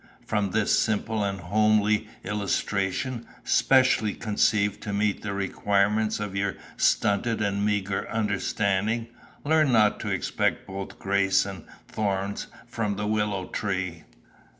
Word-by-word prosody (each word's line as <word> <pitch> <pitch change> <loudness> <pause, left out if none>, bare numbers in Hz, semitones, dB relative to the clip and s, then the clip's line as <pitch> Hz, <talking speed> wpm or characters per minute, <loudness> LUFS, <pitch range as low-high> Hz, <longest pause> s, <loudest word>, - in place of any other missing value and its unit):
From 105 -2 0
this 105 +2 +2
simple 110 0 0
and 100 -1 -2
homely 105 +3 +2 0.2
illustration, 105 +3 -2 0.2
specially 130 -5 +3
conceived 105 -1 +1
to 105 - -4
meet 105 0 0
the 105 - -4
requirements 100 +2 +1
of 105 -2 -4
your 100 0 -1 0.2
stunted 110 +3 +2
and 100 -1 0
meagre 100 -2 -1
understanding, 105 +1 0 0.4
learn 155 -2 +3
not 110 -3 +4
to - - -4
expect - - -1
both 95 0 -7
grace 100 0 +2
and 95 -4 -7 0.2
thorns 100 -1 -2 0.2
from 115 -4 -2
the 105 +1 -3
willow 105 -3 0
tree. 95 -5 -3
105 Hz, 125 wpm, -26 LUFS, 100-110 Hz, 0.4 s, not